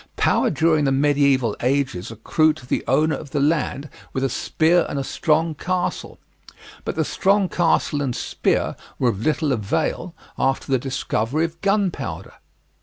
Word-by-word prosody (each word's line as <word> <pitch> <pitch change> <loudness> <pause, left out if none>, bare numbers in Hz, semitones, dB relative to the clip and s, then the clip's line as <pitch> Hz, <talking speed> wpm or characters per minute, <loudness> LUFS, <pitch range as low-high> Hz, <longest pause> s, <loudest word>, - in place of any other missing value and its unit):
Power - - +2
during 160 -1 +2
the 135 - +2
medieval 140 -4 +2
ages 130 -7 -1
accrued 155 +8 +1
to 135 - -13
the - - -1
owner 155 +4 +3
of 150 - -8
the 145 - -1
land 145 -1 0 0.3
with 130 - -1
a 135 - +1
spear 165 +7 +2
and 145 - -3
a 135 - -1
strong 160 +3 +1
castle; 180 +4 -3 0.7
but - - -3
the - - 0
strong 195 0 +2
castle 165 -4 +1
and 130 -4 -1
spear - - -1 0.2
were 125 - +2
of 100 -3 -3
little 155 +2 +1
avail 160 - -1 0.2
after 135 +1 0
the 130 - +3
discovery 135 +2 -1
of 165 0 -8
gunpowder. 195 - -1
145 Hz, 160 wpm, -22 LUFS, 135-165 Hz, 0.7 s, owner